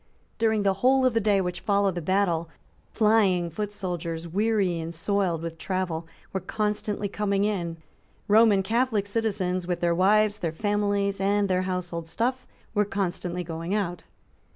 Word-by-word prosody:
During 220 -2 +2
the 195 -1 +3
whole 260 +1 +4
of 255 - +3
the 225 - +3
day 200 -2 +3
which 180 -1 -3
followed 200 -2 +1
the 175 - -4
battle, 170 -2 +1 0.4
flying 200 -6 +3
foot 205 +5 -3
soldiers, 170 -4 -4
weary 195 -1 +1
and 165 +1 -4
soiled 180 -2 0
with 165 -1 -6
travel, 175 -3 -2 0.3
were 190 - 0
constantly 210 +1 -2
coming 200 0 0
in. 175 -6 -2 0.5
Roman 210 -2 +5
Catholic 225 -1 +1
citizens, 200 -4 -1
with 180 -1 -1
their 170 -1 +2
wives, 210 +4 +3
their 170 -4 -1
families 200 +1 0
and 200 +1 +2
their 185 -1 +1
household 175 -2 -3
stuff, 245 +9 -2 0.3
were 210 -1 +3
constantly 180 -3 -3
going 165 +3 -3
out. 175 -5 -2
195 Hz, 155 wpm, -26 LUFS, 175-210 Hz, 0.5 s, Roman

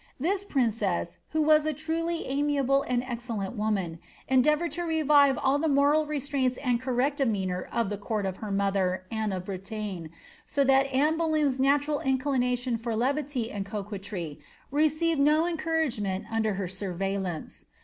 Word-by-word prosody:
This 380 +8 0
princess, 220 - -1
who 315 -1 +1
was 305 0 +4
a 310 - +1
truly 330 +3 -2
amiable 275 -1 +1
tod 245 -1 +1
excellent 235 -4 -4
woman, 200 -6 -1 0.3
endeavoured 300 +6 +3
to 350 - -2
revive 295 -5 +4
all 280 0 +2
the 320 - +1
moral 290 +2 +3
restraints 275 -3 -1
and 250 -3 0
correct 260 +2 0
demeanour 190 -8 -1
of 230 -4 0
the 205 - -3
court 210 0 -2
of 190 -1 -3
her 215 - -6
mother, 195 -2 0
Anne 220 -2 -1
of 185 -1 -4
Bretagne, 195 -2 -5 0.4
so 280 - +1
that 270 0 +4
Anne 295 +4 +2
Boleyn's 305 -5 +1
natural 285 +2 +2
inclination 255 -2 0
for 230 0 -3
levity 260 0 -1
and 200 -1 -3
coquetry 200 -5 -5 0.3
received 310 +2 +2
no 305 +3 +4
encouragement 315 - -1
while - - -12
under 220 -2 +1
her 190 -1 -2
surveillance. 190 -2 -4
255 Hz, 155 wpm, -28 LUFS, 205-295 Hz, 0.4 s, was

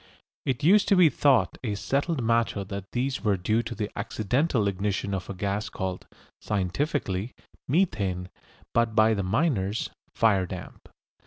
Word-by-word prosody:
It 130 +1 -1
used 195 +6 +5
to 200 - +5
be 180 -4 +7
thought 130 -9 +2
a 105 -4 -1
settled 140 - -1
matter 115 -3 +1
that 100 -1 -7
these 130 +2 -1
were 105 -3 +2
due 110 +5 +1
to 120 0 -6
the 105 -2 -3
accidental 110 +3 0
ignition 100 0 -1
of 95 -1 -4
a 100 - -4
gas 100 +2 -2
called, 95 -1 -4 0.3
scientifically, 105 - -2 0.3
"methane," 100 - 0 0.4
but 115 -2 +2
by 110 0 +5
the 100 - -1
miners 105 - 0 0.2
"fire 100 -5 +3
damp." 90 +1 -9
110 Hz, 150 wpm, -27 LUFS, 95-130 Hz, 0.4 s, be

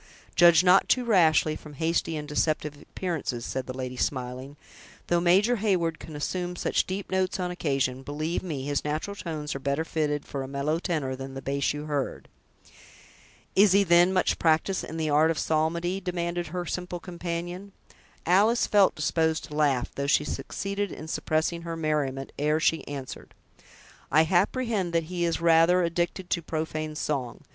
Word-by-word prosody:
"Judge 170 0 +7
not 185 +1 +5
too 250 -1 +3
rashly 160 -7 +4
from 150 -1 -11
hasty 165 +1 0
and 150 0 -6
deceptive 150 0 0
appearances," 155 -10 -4
said 130 -1 -4
the 130 0 -6
lady, 130 -1 -4
smiling; 130 +2 -3 0.5
"though 175 - +3
Major 195 +8 +4
Heyward 180 -6 0
can 155 - -9
assume 180 +4 -3
such - - 0
deep 190 +1 -5
notes 190 +1 0
on 180 -1 -2
occasion, 135 -7 -1
believe 155 +5 -3
me, 150 -7 -4
his 145 0 -1
natural 155 +7 -3
tones 155 -6 -4
are 135 - -5
better 140 +4 -1
fitted 150 -3 -1
for 140 - -5
a 135 - -5
mellow 140 +4 -1
tenor 150 -8 -2
than 135 0 -8
the - - -4
bass 140 +1 0
you 150 +1 -5
heard." 145 -3 -3 1.3
"Is 200 -1 +6
he, 200 +1 +5
then, 175 0 +5
much 185 -1 +1
practiced 165 +4 +2
in 160 - -6
the 155 -2 -1
art 155 +2 +4
of 165 - 0
psalmody?" 170 +4 0
demanded 175 -1 -2
her 180 +2 -4
simple 180 +1 -4
companion. 175 +2 -5 0.5
Alice 210 +7 +4
felt 200 -2 +4
disposed 160 +1 0
to 150 - -8
laugh, 140 -5 +1
though 140 0 -3
she 150 0 +3
succeeded 200 +9 -3
in 155 - -8
suppressing 160 +1 -1
her 165 -1 -5
merriment, 145 -4 -1
ere 150 +2 +2
she 160 0 +1
answered: 140 -2 -8 0.8
"I 155 - +6
apprehend 195 +2 +1
that 165 -1 +2
he 175 -1 0
is 165 -1 0
rather 170 +2 +5
addicted 175 +2 -2
to 170 - +1
profane 155 -1 -4
song. 135 -6 -3
160 Hz, 170 wpm, -27 LUFS, 150-180 Hz, 1.3 s, Judge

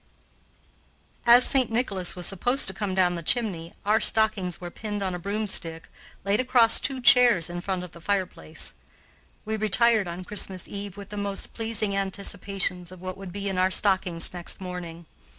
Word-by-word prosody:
As 240 +1 +7
St. 260 -4 +3
Nicholas 200 -6 0
was 180 -1 -3
supposed 245 +8 +1
to 190 - -1
come 190 -1 -4
down 180 -2 +2
the 170 - -5
chimney, 170 -4 -2
our 215 +2 +2
stockings 210 -6 +1
were 175 -1 -8
pinned 205 0 -5
on 190 -1 -2
a 180 - -5
broomstick, 195 -4 0 0.4
laid 200 +2 +1
across 245 -3 +4
two 270 -2 0
chairs 240 -9 +5
in 175 0 -5
front 185 -1 -3
of 180 - -10
the 170 - -14
fireplace. 185 - -3 0.7
We 220 0 -3
retired 215 0 +3
on 175 +2 -7
Christmas 190 -2 +1
Eve 200 -1 -7
with 200 -1 -10
the 210 - -7
most 200 -1 -4
pleasing 220 -3 -2
anticipations 195 -2 -2
of 185 - -12
what 185 0 -6
would 195 -2 -9
be 200 +2 -5
in 190 -2 -2
our 185 +1 +3
stockings 185 -4 +2
next 175 -1 -3
morning. 175 -2 -8
195 Hz, 175 wpm, -25 LUFS, 180-215 Hz, 0.7 s, As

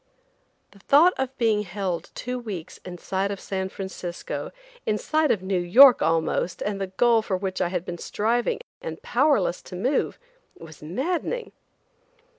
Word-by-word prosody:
The 200 - -19
thought 305 - +5
of 265 0 -2
being 220 -3 +2
held 185 -3 -4
two 250 0 -4
weeks 200 -9 -7
in 180 -1 -9
sight 190 +3 -2
of 200 -1 -4
San 190 -1 -3
Francisco, 190 -3 -6 0.3
in 210 - 0
sight 310 +5 +1
of 190 - +1
New 190 -1 0
York 240 +9 +7
almost, 165 +2 0
and 200 -1 -3
the 195 - -1
goal 230 +4 +3
for 195 -3 -2
which 190 0 -3
I 180 - +2
had 180 0 -3
been 175 -2 -6
striving 235 +3 0 0.2
and 160 0 -6
powerless 250 - +2
to - - -10
move, 250 +10 0 0.4
was 160 -2 -13
maddening. 320 - -2
195 Hz, 160 wpm, -25 LUFS, 180-245 Hz, 0.4 s, York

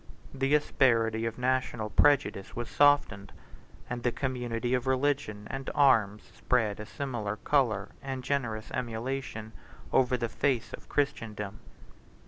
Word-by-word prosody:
The 135 +2 +2
asperity 115 -6 +2
of 115 - -5
national 125 -4 -1
prejudice 145 -9 +2
was 120 -1 -5
softened; 145 -9 +3 0.6
and 120 0 -4
the 120 - +1
community 125 -2 -2
of 125 0 0
religion 130 -5 0
and 135 0 -4
arms 110 -8 +4
spread 115 -5 0
a 105 - -7
similar 120 -7 -3
color 110 -5 +1
and 135 -1 -5
generous 120 -6 -2
emulation 120 -1 -4 0.4
over 125 -1 +3
the 120 0 -1
face 125 +1 -1
of - - -10
Christendom. 105 -7 -2
120 Hz, 125 wpm, -29 LUFS, 110-135 Hz, 0.6 s, arms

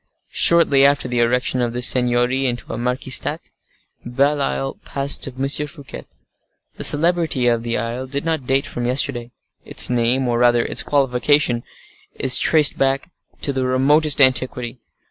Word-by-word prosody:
Shortly 165 -5 +4
after 140 -1 +2
the 120 -1 -2
erection 125 +2 0
of 120 -1 -2
this 125 0 -1
seignory 125 +1 +1
into 120 -1 -5
a - - -5
marquistate, 125 +1 -1 0.5
Belle 140 +4 0
Isle 135 0 -3
passed 140 0 -3
to 135 - -1
M. 135 +1 -2 0.2
Fouquet. 145 -2 -11 0.7
The - - -7
celebrity 160 -4 +2
of 120 -1 +1
the 115 0 -3
isle 120 +3 -5
did 140 +3 -4
not 160 -6 -3
date 135 +1 0
from 120 0 -5
yesterday; 125 -2 -1 0.3
its - - +1
name, 125 +2 0
or 120 -1 -1
rather 120 -1 +2
its - - +1
qualification, 135 -2 +1 0.5
is 130 -1 +3
traced 155 -3 +3
back 135 +5 -1 0.3
to 140 - -1
the 130 -1 -2
remotest 145 +4 +2
antiquity. 130 -2 +1
130 Hz, 155 wpm, -19 LUFS, 120-140 Hz, 0.7 s, Shortly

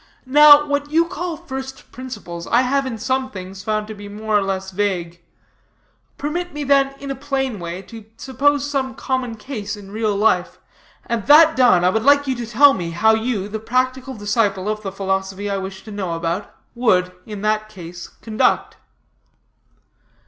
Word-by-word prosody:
Now, 295 +2 +8
what 285 0 -2
you 330 +2 +3
call 345 -1 -4
first 265 -4 -8
principles, 175 -10 -8
I 240 +2 +3
have, 275 +1 0
in 235 -3 -4
some 260 +3 -1
things, 190 -2 -9
found 215 0 -1
to 215 - -8
be 205 -1 -10
more 215 +1 -3
or 205 - +4
less 190 -1 -3
vague. 180 -4 -2 1.0
Permit 350 +5 -3
me, 295 0 -4
then, 275 0 +2
in 275 0 -5
a - - -3
plain 270 -5 -2
way, 175 +2 -6
to 225 +2 -12
suppose 285 +2 +1
some 265 -3 -2
common 260 -3 -2
case 215 -3 -6
in 200 -1 -12
real 215 -1 -1
life, 200 -3 +1 0.5
and 235 -4 -3
that 315 +2 +7
done, 245 -9 +5
I 180 - +5
would 220 - 0
like 285 +3 +4
you 265 - 0
to 240 -1 -5
tell 275 +5 +6
me 175 -7 -4
how 195 +7 +3
you, 220 -3 -1
the 220 +1 -5
practical 255 +3 -1
disciple 205 -2 0
of 215 0 -2
the 195 -2 -5
philosophy 195 +1 -2
I 195 - -1
wish 190 0 -7
to 215 - -10
know 190 -4 -3
about, 170 +4 -3 0.2
would, 185 -7 +2 0.2
in 210 -2 -7
that 215 0 0
case, 175 -4 -9
conduct." 220 0 -1
220 Hz, 180 wpm, -20 LUFS, 195-265 Hz, 1.0 s, Now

